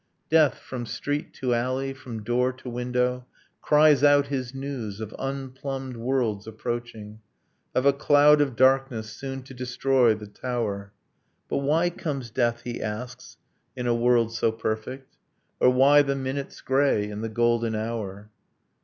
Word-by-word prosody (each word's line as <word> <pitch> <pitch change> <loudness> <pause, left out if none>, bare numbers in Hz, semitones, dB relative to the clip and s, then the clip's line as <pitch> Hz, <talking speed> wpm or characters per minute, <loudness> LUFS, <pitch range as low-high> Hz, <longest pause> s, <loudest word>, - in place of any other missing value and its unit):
Death, 155 -4 +4
from 120 -2 -7
street 145 +5 -3
to 125 -3 -1
alley, 130 +3 -1
from 120 -5 -8
door 125 +3 +1
to 130 0 -13
window, 125 +1 -1 0.3
Cries 150 -2 +5
out 145 -1 +5
his 130 -3 -3
news, 135 -7 -5
of 110 -1 -6
unplumbed 135 -1 -5
worlds 115 -4 -1
approaching, 110 -1 -6 0.6
Of 130 - +2
a 140 - +6
cloud 145 +1 +5
of 135 -4 0
darkness 130 -4 +2
soon 135 +3 -6
to 130 - -12
destroy 125 -1 +2
the 105 0 -9
tower. 105 -2 -4 0.6
But - - 0
why 155 +5 +2
comes 140 -9 -5
death, 120 -1 0
he 120 -1 -5
asks, 115 +1 -6 0.4
in 125 -1 -4
a 120 - +2
world 120 -1 +2
so 115 0 +1
perfect? 110 +4 -5 0.4
Or - - +6
why 135 +3 +6
the 140 -1 0
minute's 135 +1 -4
grey 130 -6 +2
in 105 0 -6
the 115 - -3
golden 115 0 +1
hour? 110 -2 -5
125 Hz, 150 wpm, -25 LUFS, 115-135 Hz, 0.6 s, a